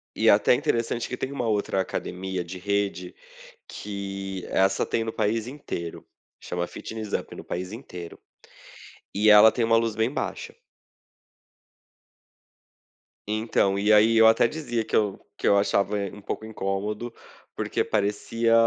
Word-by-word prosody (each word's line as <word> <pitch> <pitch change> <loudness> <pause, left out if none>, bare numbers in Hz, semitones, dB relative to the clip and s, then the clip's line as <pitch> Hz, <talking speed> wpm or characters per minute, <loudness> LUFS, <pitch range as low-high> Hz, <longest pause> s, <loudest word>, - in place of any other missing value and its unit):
E - - +4
até - - +5
interessante 115 0 0
que 125 - -4
tem 130 - -3
uma 130 -4 -2
outra 100 -3 +1
academia 95 0 -4
de 90 +2 -8
rede, 100 -2 -2 0.5
que 95 -2 -6
essa 95 0 +2
tem 115 - -1
no 110 - -3
país 110 +1 -1
inteiro, 125 - -6 0.3
chama 90 0 -3
Fitness 110 +1 -7
Up - - -2
é - - -9
no - - -8
país 90 +1 -5
inteiro, 90 -8 -9 1.0
e 105 +2 +4
ela 105 +1 +9
tem 120 - -1
uma 115 0 +4
luz 115 -1 -1
bem 110 +2 +1
baixa. - - -4 2.7
Então, 105 -2 +1
e 105 +2 +4
aí 110 +2 +5
eu 110 0 +8
até 115 +1 +5
dizia 120 -7 -2
que - - -14
eu 105 -3 +2 0.2
que - - -1
eu 100 - +5
achava 100 +1 +1
um 100 0 -4
pouco 110 - -5
incômodo, 105 +2 -3 0.4
porque - - -1
parecia, 110 +3 0
105 Hz, 150 wpm, -25 LUFS, 95-115 Hz, 2.7 s, ela